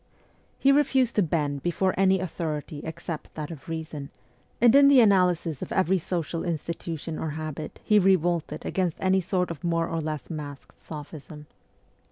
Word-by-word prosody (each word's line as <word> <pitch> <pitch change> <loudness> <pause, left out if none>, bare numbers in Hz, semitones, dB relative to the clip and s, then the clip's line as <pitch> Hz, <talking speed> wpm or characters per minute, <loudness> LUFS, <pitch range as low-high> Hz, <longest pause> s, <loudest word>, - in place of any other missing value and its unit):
He 275 - +4
refused 265 -4 +3
to - - +6
bend 150 -5 0
before 175 +3 0
any 190 0 +3
authority 155 -4 -4
except 160 0 -6
that 155 +1 -5
of 160 -1 -10
reason, 160 -3 -5 0.5
and 240 0 +6
in 280 0 +8
the 280 -2 +7
analysis 180 - +3
of - - -6
every 190 0 +2
social 165 -1 -3
institution 165 -1 -4
or 160 - -2
habit 155 -1 -6
he 210 -1 +4
revolted 175 -3 +1
against 180 -4 -1
any 190 0 +2
sort 180 0 -1
of 160 - -8
more 165 -1 +1
or 165 -1 -2
less 155 -3 -4
masked 145 -3 -8
sophism. 150 0 -9
170 Hz, 160 wpm, -26 LUFS, 155-190 Hz, 0.5 s, in